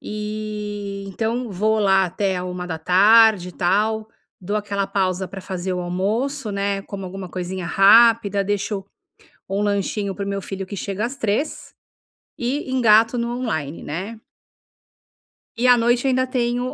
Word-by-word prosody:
e 210 -1 -5
então 225 +4 -2
vou 215 +3 +1
lá 195 -2 +4
até 190 +1 -1
à 180 - -4
13:00 180 +3 +4
e - - -10
tal, 215 +5 0 0.3
dou 200 +3 -4
aquela 200 -1 -2
pausa 190 -1 -1
para 190 +1 -8
fazer 185 0 -4
o 180 - -2
almoço, 215 +9 -2
né. 200 0 -1
Como 195 -1 -7
alguma 185 0 -7
coisinha 185 0 -4
rápida, 205 0 +5
deixo 205 0 -2 0.7
um 195 +1 -1
lanchinho 200 0 -1
para 200 +1 -5
o - - -5
meu 200 0 -3
filho, 195 0 -6
que 200 - -6
chega 200 +3 -3
às 255 +3 -5
15:00 275 +4 -2 0.7
e 260 +3 -2
engato 225 -2 +4
no 235 +1 -2
online, 160 - -3
né. 190 +9 -5 1.4
E 240 - +1
à 245 -1 +7
noite 240 +2 +2
ainda 255 0 +2
tenho 245 0 -1
205 Hz, 150 wpm, -21 LUFS, 190-225 Hz, 1.4 s, à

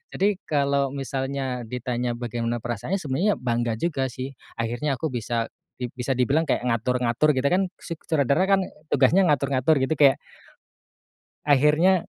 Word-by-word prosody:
Jadi, 200 0 +1
kalau 140 -2 +1
misalnya 135 -2 -3
ditanya 125 0 -2
bagaimana 120 -1 -3
perasaannya, 120 - -2
sebenarnya 185 +4 0
bangga 120 -2 -1
juga 135 0 -1
sih, 130 +2 -6 0.2
akhirnya 120 +5 -1
aku 150 +2 -3
bisa 115 -1 -2 0.3
di 125 - -2
bisa 130 +2 -1
dibilang 140 +6 +2
kayak 135 - 0
ngatur-ngatur 125 +4 +1
gitu, 130 +2 +1
kan, 190 +2 +2 0.2
su 170 -3 -6
sutradara 150 +3 +2
kan, 195 0 +3 0.3
tugasnya 150 +8 +4
ngatur-ngatur 140 -1 +2
gitu, 140 +3 0
kayak 140 -2 +7 1.3
akhirnya 150 +6 +4
135 Hz, 140 wpm, -24 LUFS, 120-150 Hz, 1.3 s, kayak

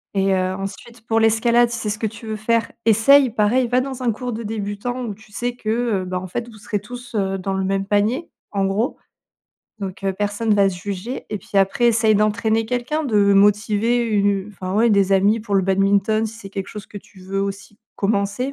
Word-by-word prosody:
Et 195 0 +2
heu, 185 0 0
ensuite, 220 +4 -8
pour 225 0 +1
l'escalade, 235 +2 +3
si 235 - -4
c'est 215 - -3
ce 210 +1 -3
que 220 - 0
tu 225 +2 -10
veux 220 -1 -3
faire, 230 +2 0
essaye. 250 +5 +6
Pareil, 230 +3 +2
va 250 +2 +2
dans 265 -1 -5
un 240 - +2
cours 245 +2 -4
de 225 +1 -5
débutant, 215 +3 -4
où 215 - -4
tu 215 +1 -18
sais 240 +4 -3
que, 220 -3 -5 0.3
heu, - - -7
bah, 180 0 -3
en 185 - -7
fait, 235 +6 -4
vous 220 - -13
serez 205 0 -3
tous, 245 +3 -10
heu, 195 -2 0
dans 195 +1 -3
le 190 0 -1
même 195 0 0
panier, 215 +10 0 0.2
en 195 -1 0
gros. 205 +6 -1 0.8
Donc, 195 -2 -6
heu, 195 - +1
personne 205 +2 0
va 200 -1 +4
se 180 - -7
juger. 205 +6 -5
Et 210 - -3
puis 195 +2 -2
après, 195 +5 +2
essaye 220 -1 +3
d'entraîner 220 +2 +1
quelqu'un, 250 +6 -2
de 205 -6 +3
motiver 210 +3 +3
u 200 -2 +1
enfin 185 -1 -5
ouais 225 +3 +4
des 200 -2 +3
amis 200 +3 +4
pour 210 -2 -3
le 195 - +5
badminton, 195 +3 +2
si 215 - -7
c'est 195 - -9
quelque 195 0 -5
chose 210 -2 -8
que - - -12
tu 190 -1 -19
veux 195 +1 -3
aussi 200 +1 -6 0.2
commencer. 205 +5 -1
210 Hz, 225 wpm, -21 LUFS, 195-230 Hz, 0.8 s, essaye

